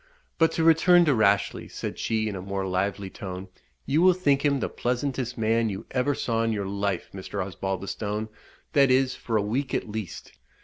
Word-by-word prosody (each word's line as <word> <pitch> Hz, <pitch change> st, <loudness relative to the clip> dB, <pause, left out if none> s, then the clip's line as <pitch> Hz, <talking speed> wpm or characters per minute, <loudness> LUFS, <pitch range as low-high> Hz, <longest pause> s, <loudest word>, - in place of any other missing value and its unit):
But 165 Hz, -1 st, +4 dB
to 165 Hz, -, 0 dB
return 170 Hz, +2 st, +6 dB
to 150 Hz, -, +4 dB
Rashleigh," 100 Hz, -4 st, +2 dB
said -, -, -6 dB
she, 110 Hz, -1 st, 0 dB
in 105 Hz, -, -3 dB
a 95 Hz, -, -5 dB
more 95 Hz, 0 st, -3 dB
lively 95 Hz, +1 st, -2 dB
tone, 95 Hz, 0 st, -7 dB, 0.4 s
"you 150 Hz, +4 st, +2 dB
will 185 Hz, 0 st, +6 dB
think 140 Hz, -7 st, +2 dB
him 140 Hz, -2 st, +2 dB
the -, -, -1 dB
pleasantest 125 Hz, 0 st, -2 dB
man 115 Hz, 0 st, +2 dB
you 95 Hz, -2 st, -6 dB
ever 135 Hz, +2 st, +1 dB
saw 115 Hz, -3 st, -1 dB
in 115 Hz, 0 st, +1 dB
your 105 Hz, -2 st, -2 dB
life, 100 Hz, 0 st, -2 dB
Mr. 95 Hz, +1 st, -6 dB
Osbaldistone, 100 Hz, +3 st, -3 dB, 0.5 s
that 140 Hz, -2 st, +5 dB
is, 130 Hz, 0 st, +3 dB
for 115 Hz, -2 st, -2 dB
a 105 Hz, -, +1 dB
week 125 Hz, +6 st, -1 dB
at -, -, -2 dB
least. 105 Hz, -4 st, -6 dB
110 Hz, 190 wpm, -26 LUFS, 100-135 Hz, 0.5 s, return